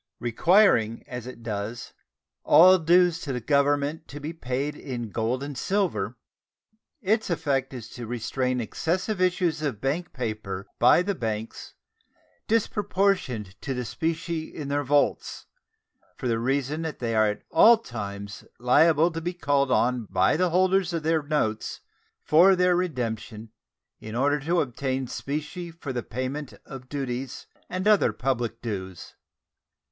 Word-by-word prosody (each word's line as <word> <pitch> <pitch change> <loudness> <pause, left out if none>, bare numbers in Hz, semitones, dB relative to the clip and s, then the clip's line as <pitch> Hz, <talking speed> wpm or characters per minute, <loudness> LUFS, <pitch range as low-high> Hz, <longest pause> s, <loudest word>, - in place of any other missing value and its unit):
Requiring, 120 - +3
as 125 -1 -7
it 120 -2 -10
does, 110 +1 -5 0.5
all 185 +3 +7
dues 175 +1 +4
to 140 - -4
the 125 - -2
Government 145 +4 +1
to 145 - -8
be 150 +3 -5
paid 140 0 -3
in 120 -7 -6
gold 120 +5 -1
and 145 0 -6
silver, 195 +8 -1 0.9
its 215 +2 +1
effect 140 -6 0
is 120 -4 -8
to 120 -2 -8
restrain 125 +2 -1
excessive 180 - -2
issues 180 -4 +1
of 140 -9 -2
bank 155 +8 -2
paper 110 -7 -4
by 125 +8 +6
the 200 +2 -1
banks 110 - -5 0.7
disproportioned 195 - 0
to 135 -2 -3
the 125 0 -3
specie 165 +4 -2
in 145 -3 -7
their 145 +1 0
vaults, 145 +1 0 0.7
for 130 - -3
the 115 -1 +1
reason 140 +5 -1
that 160 -2 -4
they 115 -2 -2
are 110 -1 +4
at 105 0 -3
all 225 +8 +7
times 100 - -7
liable 155 +7 +4
to 165 0 -5
be 175 +2 -3
called 140 -4 +1
on 125 -2 +2
by 95 0 +3
the 180 +3 +2
holders 185 0 +2
of 165 -2 -2
their 160 0 +2
notes 145 -8 -2 0.4
for 180 +5 +6
their 180 0 +3
redemption 115 - -3 0.5
in 110 +1 -8
order 145 +4 +2
to 165 +5 +1
obtain 130 0 -2
specie 155 +7 -5
for 160 -5 -7
the 120 - -2
payment 130 +5 -5
of 130 -1 -10
duties 135 -2 -4 0.2
and 185 +3 -2
other 210 -2 +5
public 120 -3 -2
dues. 95 -6 -6
140 Hz, 145 wpm, -26 LUFS, 120-170 Hz, 0.9 s, all